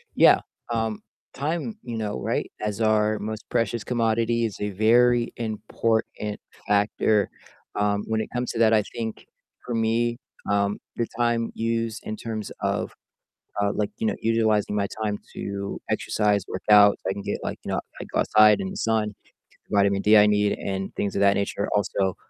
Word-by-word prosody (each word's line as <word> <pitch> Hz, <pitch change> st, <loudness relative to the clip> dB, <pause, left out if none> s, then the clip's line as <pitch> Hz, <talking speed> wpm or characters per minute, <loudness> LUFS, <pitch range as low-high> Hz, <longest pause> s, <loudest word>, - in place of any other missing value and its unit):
Yeah, -, -, +7 dB, 0.3 s
um, 110 Hz, -2 st, -1 dB, 0.3 s
time, 165 Hz, -, -3 dB
you 120 Hz, -2 st, -5 dB
know, 105 Hz, -12 st, -3 dB
right, -, -, -2 dB
as 105 Hz, +1 st, -2 dB
our 110 Hz, 0 st, +3 dB
most 110 Hz, 0 st, -6 dB
precious 115 Hz, -2 st, 0 dB
commodity 115 Hz, 0 st, +1 dB
is 105 Hz, -, -4 dB
a 105 Hz, -, -1 dB
very 120 Hz, +4 st, +3 dB
important 110 Hz, -1 st, -2 dB, 0.3 s
factor, 105 Hz, 0 st, +2 dB, 0.5 s
um, 105 Hz, 0 st, +1 dB
when 110 Hz, 0 st, 0 dB
it -, -, -5 dB
comes 125 Hz, 0 st, -2 dB
to 115 Hz, -, -4 dB
that, 110 Hz, -1 st, +5 dB
I 110 Hz, -, +4 dB
think 110 Hz, -1 st, -5 dB, 0.4 s
for 120 Hz, -, -3 dB
me, 115 Hz, +1 st, +1 dB, 0.3 s
um, 100 Hz, 0 st, +1 dB, 0.2 s
the 115 Hz, -, 0 dB
time 120 Hz, -1 st, +1 dB
used 115 Hz, -1 st, -1 dB
in 110 Hz, -, -3 dB
terms 110 Hz, -2 st, -5 dB
of, -, -, -1 dB, 0.7 s
uh 100 Hz, 0 st, +2 dB
like, 105 Hz, -1 st, -1 dB
you -, -, -2 dB
know, -, -, +2 dB
utilizing 110 Hz, -2 st, +2 dB
my 100 Hz, -1 st, +1 dB, 0.2 s
time 105 Hz, -1 st, -1 dB, 0.2 s
to 100 Hz, 0 st, -4 dB
exercise, 105 Hz, -2 st, +1 dB
work 95 Hz, -, -5 dB
out, 105 Hz, -1 st, +8 dB
so -, -, -4 dB
I -, -, 0 dB
can 100 Hz, 0 st, -7 dB
get, -, -, -3 dB
like, -, -, -3 dB
you -, -, -4 dB
know, -, -, 0 dB, 0.2 s
I -, -, -5 dB
go -, -, +1 dB
outside 110 Hz, 0 st, +5 dB
in 190 Hz, -, -3 dB
the 195 Hz, -, -7 dB
sun, 110 Hz, -, 0 dB
get -, -, -29 dB, 0.4 s
the -, -, 0 dB
vitamin 100 Hz, 0 st, +3 dB
D 105 Hz, +2 st, +6 dB
I 105 Hz, 0 st, +8 dB
need, 105 Hz, 0 st, +2 dB
and 95 Hz, -1 st, -4 dB
things 100 Hz, -, -1 dB
of 100 Hz, -, 0 dB
that 100 Hz, 0 st, +5 dB
nature, 100 Hz, 0 st, -1 dB
also, 95 Hz, -2 st, 0 dB
110 Hz, 185 wpm, -25 LUFS, 105-115 Hz, 0.7 s, out